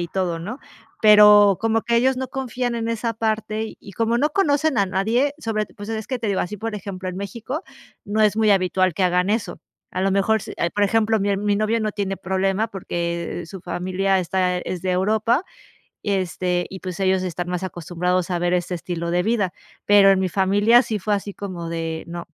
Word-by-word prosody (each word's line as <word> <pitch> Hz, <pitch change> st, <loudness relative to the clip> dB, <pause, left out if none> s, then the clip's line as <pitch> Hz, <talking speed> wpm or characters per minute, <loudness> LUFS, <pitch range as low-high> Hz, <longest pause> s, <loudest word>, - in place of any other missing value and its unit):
y 170 Hz, -, -3 dB
todo, 180 Hz, -2 st, -1 dB
¿no? 210 Hz, +10 st, -6 dB, 0.4 s
Pero 210 Hz, -2 st, +7 dB
como 225 Hz, 0 st, +1 dB
que 235 Hz, -, +1 dB
ellos 260 Hz, +2 st, +3 dB
no 260 Hz, 0 st, -3 dB
confían 250 Hz, -2 st, -3 dB
en 230 Hz, -1 st, -2 dB
esa 230 Hz, 0 st, -1 dB
parte 220 Hz, 0 st, -2 dB
y 200 Hz, -, -12 dB
como 230 Hz, +3 st, 0 dB
no 300 Hz, +3 st, +2 dB
conocen 310 Hz, -, +2 dB
a 200 Hz, -, +3 dB
nadie 225 Hz, +9 st, +1 dB
sobre 215 Hz, -4 st, -2 dB
pues, 205 Hz, 0 st, -11 dB
es 220 Hz, -1 st, -4 dB
que 255 Hz, -1 st, -3 dB
te 230 Hz, -, -3 dB
digo 200 Hz, -, 0 dB
así, 210 Hz, +4 st, -3 dB
por 225 Hz, +2 st, -4 dB
ejemplo, 190 Hz, -2 st, -6 dB
en 185 Hz, -, -5 dB
México, 235 Hz, -, -5 dB, 0.4 s
no 210 Hz, +2 st, -1 dB
es 210 Hz, 0 st, +3 dB
muy 220 Hz, -1 st, +3 dB
habitual 185 Hz, -2 st, +2 dB
que 190 Hz, -, -1 dB
hagan 180 Hz, +2 st, +2 dB
eso. 220 Hz, -1 st, -2 dB, 0.3 s
A 185 Hz, -, -3 dB
lo 195 Hz, -, +2 dB
mejor 200 Hz, +2 st, +2 dB
si, -, -, -8 dB
eh, 170 Hz, -, 0 dB
por 205 Hz, -, -1 dB
ejemplo, 220 Hz, +1 st, +2 dB
mi 200 Hz, 0 st, +1 dB
mi 205 Hz, 0 st, 0 dB
novio 215 Hz, +2 st, +1 dB
no 215 Hz, -1 st, -1 dB
tiene 195 Hz, -2 st, -2 dB
problema 190 Hz, +3 st, 0 dB
porque 170 Hz, -2 st, -4 dB
su 190 Hz, +2 st, -9 dB
familia 185 Hz, +2 st, 0 dB
está 180 Hz, 0 st, 0 dB
es 180 Hz, -1 st, -5 dB
de 185 Hz, -, -1 dB
Europa, 220 Hz, -, +1 dB, 0.6 s
y 205 Hz, -, -1 dB
este 180 Hz, -1 st, -1 dB
y 190 Hz, -, -8 dB
pues 185 Hz, 0 st, -6 dB
ellos 190 Hz, -1 st, +2 dB
están 175 Hz, -1 st, -4 dB
más 180 Hz, +1 st, -3 dB
acostumbrados 180 Hz, 0 st, -2 dB
a 175 Hz, -, +1 dB
ver 175 Hz, +1 st, 0 dB
este 180 Hz, 0 st, -1 dB
estilo 170 Hz, 0 st, -4 dB
de 180 Hz, 0 st, +1 dB
vida. 210 Hz, -4 st, 0 dB, 0.3 s
Pero 205 Hz, -1 st, +6 dB
en 190 Hz, -, +3 dB
mi 190 Hz, -, +1 dB
familia 205 Hz, +6 st, +4 dB
sí 225 Hz, -3 st, -3 dB
fue 210 Hz, +2 st, -1 dB
así 205 Hz, 0 st, -3 dB
como 180 Hz, -5 st, -6 dB
de, 165 Hz, -1 st, -3 dB
no. 170 Hz, 0 st, -6 dB
200 Hz, 215 wpm, -22 LUFS, 180-220 Hz, 0.6 s, Pero